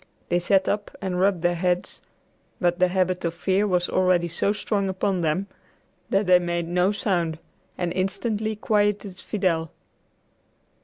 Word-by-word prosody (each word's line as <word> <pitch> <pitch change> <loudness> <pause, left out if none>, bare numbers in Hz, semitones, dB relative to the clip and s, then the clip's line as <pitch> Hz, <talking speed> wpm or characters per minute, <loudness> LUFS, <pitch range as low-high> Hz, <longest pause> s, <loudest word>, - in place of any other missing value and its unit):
They 175 - +2
sat 190 +2 +2
up 205 0 -1
and 185 -2 -2
rubbed 190 -2 +2
their 175 0 +3
heads, 180 +1 -1 0.6
but 175 0 +1
the 185 - +5
habit 185 0 0
of 170 -1 -2
fear 190 +4 +1
was 180 -2 +1
already 185 -2 +2
so 170 +4 0
strong 205 -2 -1
upon 190 0 -1
them 165 +4 0 0.6
that 195 +2 +2
they 180 -1 +6
made 175 -1 -2
no 180 +3 +2
sound 175 -6 -1 0.4
and 175 -1 -2
instantly 205 +4 -1
quieted 205 -2 0
Fidel. 170 -6 -1
185 Hz, 150 wpm, -24 LUFS, 175-200 Hz, 0.6 s, they